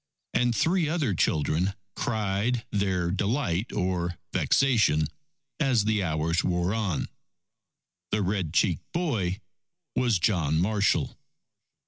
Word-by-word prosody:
And 120 0 +2
three 165 - +2
other 155 - 0
children 85 +3 +1 0.2
cried 110 +2 -1
their 95 -4 0
delight 100 0 -1
or 90 -2 -1 0.2
vexation 110 - +3 0.5
as 130 -8 +2
the 110 -1 +2
hours 85 -1 0
wore 90 +1 0
on. 105 -8 -1 1.0
The 105 -1 0
red 95 -4 -1
cheeked 85 -1 0
boy 110 - -1 0.5
was 120 -5 +2
John 85 -5 +1
Marshall. 100 +2 +1
100 Hz, 105 wpm, -27 LUFS, 90-115 Hz, 1.0 s, vexation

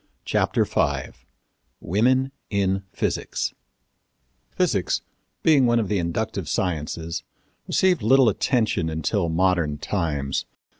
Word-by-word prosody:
CHAPTER - - +1
V - - 0 0.7
WOMEN 130 +8 +2 0.2
IN 95 -1 +1
PHYSICS - - -2 1.0
Physics, - - 0 0.4
being 145 -6 +5
one 120 0 +3
of 105 -4 -1
the 100 - +1
inductive 85 -1 -2
sciences, 85 -2 -2 0.4
received 185 -6 +2
little 130 +4 +5
attention 110 -5 +1
until 80 +3 -1
modern 85 -3 +1
times. 75 -5 -2
95 Hz, 100 wpm, -24 LUFS, 80-120 Hz, 1.0 s, being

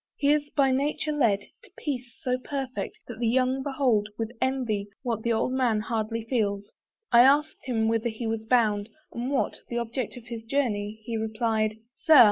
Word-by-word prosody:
He 285 0 +2
is 295 -1 0
by 275 -2 +4
nature 290 +3 0
led 230 -9 +2 0.2
To - - -17
peace 250 -5 -4
so 250 0 0
perfect, 265 -1 -4
that 235 -2 -8
the 235 - +1
young 255 +2 +2
behold 260 -7 +1
With 225 0 -3
envy, 245 -6 0 0.2
what 230 -4 -1
the 235 - 0
old 230 +3 +1
man 245 -5 +2
hardly 225 0 -2
feels. 205 -5 -1 0.4
I 235 - +8
asked 290 +4 +3
him 225 -3 +1
whither 225 +1 +1
he 225 +1 -5
was 225 0 -2
bound, 220 -3 +2 0.2
and 240 +2 -3
what 275 - 0
The 240 - -2
object 235 +1 -3
of 240 - -11
his 235 -1 -6
journey; 220 -4 -1
he 230 -1 -2
replied 220 -1 0 0.2
"Sir! 310 +1 +6
235 Hz, 185 wpm, -27 LUFS, 220-260 Hz, 0.4 s, I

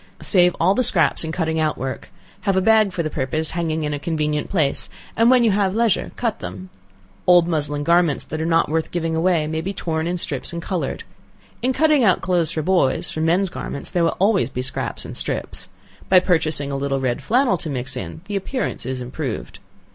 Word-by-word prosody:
Save 180 -3 +4
all 190 - +4
the 255 - +1
scraps 175 -8 +2
in 160 - -3
cutting 160 -1 -1
out 155 -1 0
work; 130 +1 -5 0.3
have 195 -1 0
a - - +5
bag 215 0 +4
for 175 -2 -2
the 155 - -2
purpose 155 +5 -1
hanging 160 -2 -2
in 150 0 -2
a 145 - -3
convenient 150 -1 -2
place, 155 -8 0 0.3
and 230 +1 +4
when 250 -1 +5
you 225 - +4
have 195 -1 +1
leisure 230 -4 +1
cut 230 -3 -2
them. 90 +1 -8 0.6
Old 175 -1 +6
muslin 145 -3 -1
garments 170 -2 +2
that 155 +1 -5
are - - -1
not 165 0 +3
worth 160 +1 -1
giving 165 -2 -2
away, 165 -1 +2
may 160 +1 -2
be 195 +4 -4
torn 160 -2 -2
in 180 +1 -1
strips 140 -6 0
and 170 - -4
colored. 175 +1 -3 0.6
In 255 - +1
cutting 305 -1 +3
out 190 -5 +4
clothes 175 -4 +1
for 155 - -2
boys, 180 -6 +1
from 160 0 -2
men's 180 +4 +2
garments, 140 - -4
there 175 - +1
will 165 - 0
always 195 -5 +2
be 125 -1 -4
scraps 130 - -4
and - - -7
strips. - - -4 0.4
By 185 - +7
purchasing 155 -6 +1
a - - -2
little 135 0 -1
red 125 -2 -1
flannel 240 -6 +2
to 155 - -5
mix 130 -2 -4
in, 90 - -6
the 205 +1 -5
appearance 200 - -3
is 130 -1 -3
improved. 125 - -5
165 Hz, 215 wpm, -21 LUFS, 150-190 Hz, 0.6 s, By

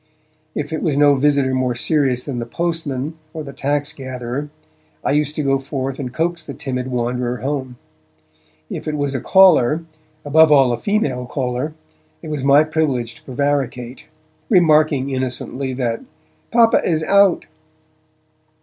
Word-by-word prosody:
If 150 +1 -3
it 160 - -2
was 150 -5 0
no 145 0 +6
visitor 140 -1 +2
more 130 -1 0
serious 130 -1 +1
than 130 -4 -4
the 120 - -5
postman 160 -1 -3 0.2
or 155 - -4
the 140 -1 -9
tax 145 +1 -1
gatherer, 130 +1 -5 0.5
I - - 0
used 150 +1 +1
to 150 - -1
go 135 -1 +2
forth 135 -1 -4
and 130 -3 -4
coax 165 +4 -2
the 140 -3 -8
timid 130 -2 -4
wanderer 125 0 -2
home. 130 -2 -3 0.9
If - - -6
it 150 -1 -2
was 145 -1 -1
a 130 - -2
caller, 165 -5 +5 0.4
above 155 +2 +5
all 135 -4 +5
a - - -3
female 140 - -1
caller, 130 +3 -3 0.5
it - - -7
was 145 -3 -3
my 140 +2 +6
privilege 145 -7 -1
to - - -18
prevaricate, 130 -2 -2 0.4
remarking 155 - +3
innocently 130 +1 -3
that 125 -3 -2 0.5
'Papa 230 -1 +5
is 160 -2 0
out!' 200 +1 +4
140 Hz, 150 wpm, -19 LUFS, 130-155 Hz, 0.9 s, no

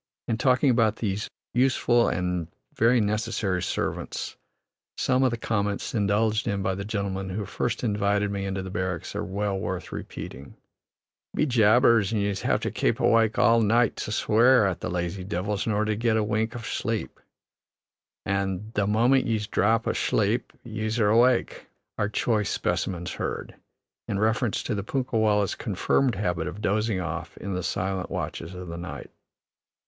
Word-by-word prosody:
In 115 -1 -1
talking 130 +1 +4
about 115 -3 +3
these 105 -1 -2 0.2
useful 125 -2 +3
and 90 -1 -1 0.3
very 120 +2 +4
necessary 105 -3 0
servants, - - -3 0.6
some 130 0 +2
of 130 - +4
the 120 - -3
comments 105 -2 -2
indulged 105 +1 +1
in 100 -1 -1
by 95 - 0
the 100 +1 -4
gentleman 100 -2 -3
who 100 +2 -3
first - - -2
invited 105 -2 +1
me 100 -1 -3
into 95 0 -3
the 95 - -7
barracks 95 -4 -3
are - - -2
well 100 0 -2
worth - - -4
repeating: 65 +1 -8 0.8
"Be - - +2
jabbers, 115 -3 +4
an' 110 - 0
yeez 100 -1 -1
have - - +1
to - - -2
kape - - 0
wide - - +3
awake 115 -1 +3
all 115 0 +5
night 115 +2 +3
to - - -4
swear 115 +2 +4
at 95 -3 -1
the - - -4
lazy 90 +1 -3
divils, 100 +2 -2
in - - +1
orther 105 +1 +1
to 110 0 0
git 115 0 +1
a 110 - +2
wink 110 +2 -1
av 120 - -6
shlape" 115 - -3 1.1
and 100 +2 -2
"The 100 -1 +1
moment 120 +6 +3
yeez 110 -2 0
dhrap 110 +2 +2
ashlape, 110 +4 0
yeez 110 0 -3
are 105 -2 +4
awake," 120 +3 +3 0.3
are 105 - +1
choice 105 -1 0
specimens, 90 -1 -2
heard - - -4 0.5
in 100 - -1
reference 110 +2 +1
to - - -2
the 100 -2 -2
punkah 125 +1 -1
wallahs' 105 -3 +2
confirmed 130 -5 0
habit 90 -5 -1
of 100 - -6
dozing 105 -1 0
off 85 -1 -5
in 100 0 -5
the 90 - -2
silent 95 +2 -2
watches 85 +3 -4
of 90 0 -7
the 85 0 -6
night. 90 +1 -7
105 Hz, 170 wpm, -26 LUFS, 95-115 Hz, 1.1 s, all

